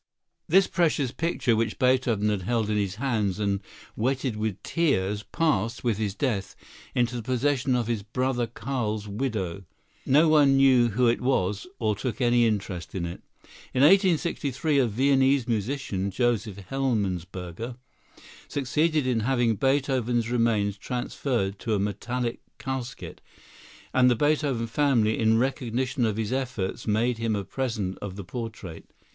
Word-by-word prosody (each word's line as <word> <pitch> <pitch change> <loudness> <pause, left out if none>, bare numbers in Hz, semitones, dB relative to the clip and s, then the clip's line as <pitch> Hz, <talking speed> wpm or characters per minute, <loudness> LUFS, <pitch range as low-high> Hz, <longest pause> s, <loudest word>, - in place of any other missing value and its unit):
This 190 +3 +5
precious 155 -8 +1
picture, 160 -8 0
which 115 0 -1
Beethoven 125 -5 +2
had 105 -2 -1
held 110 +2 0
in - - +1
his 100 -2 -1
hands 110 -6 -1
and 100 -2 0 0.4
wetted 130 +1 -1
with 105 0 -1
his - - -9
tears, 105 - +1
passed, 120 - -1
with 115 -4 0
his 105 -3 -2
death, 105 -8 -2 0.4
into 120 0 +1
the 120 - -3
possession 130 +2 +1
of 120 -2 0
his 115 -2 -1
brother 120 +3 -1
Carl's 110 -3 -3
widow. 100 -5 -3 0.4
No 150 +5 +4
one 145 -3 +5
knew 130 -3 +5
who 125 +4 +1
it 115 - +2
was, 105 - 0
or 110 -3 0
took 125 +5 -4
any 120 -2 +4
interest 95 -6 -3
in 90 -2 -2
it. 85 +1 -7 0.5
In 130 - +3
1863 160 - +3
a 130 - +3
Viennese 135 +2 +2
musician, 110 -3 -2
Joseph 110 -2 0
Hellmesberger, 100 -4 -2 0.7
succeeded 150 +2 0
in 125 -3 +1
having 120 -1 +1
Beethoven's 130 -2 +1
remains 110 -4 +1
transferred 120 -5 -2
to 110 -2 -1
a - - 0
metallic 120 +4 -2 0.2
casket, 130 -2 -6 0.7
and 125 -1 +5
the 120 - +3
Beethoven 145 -3 +1
family, 115 -3 +2
in 110 0 +3
recognition 130 0 0
of 105 -1 -2
his 110 +2 -2
efforts, 125 -9 -3
made 115 +2 +1
him 115 -2 0
a 100 - -2
present 105 -3 -3
of 100 -2 -5
the 100 - -6
portrait. 105 -5 -7
120 Hz, 150 wpm, -26 LUFS, 105-135 Hz, 0.7 s, This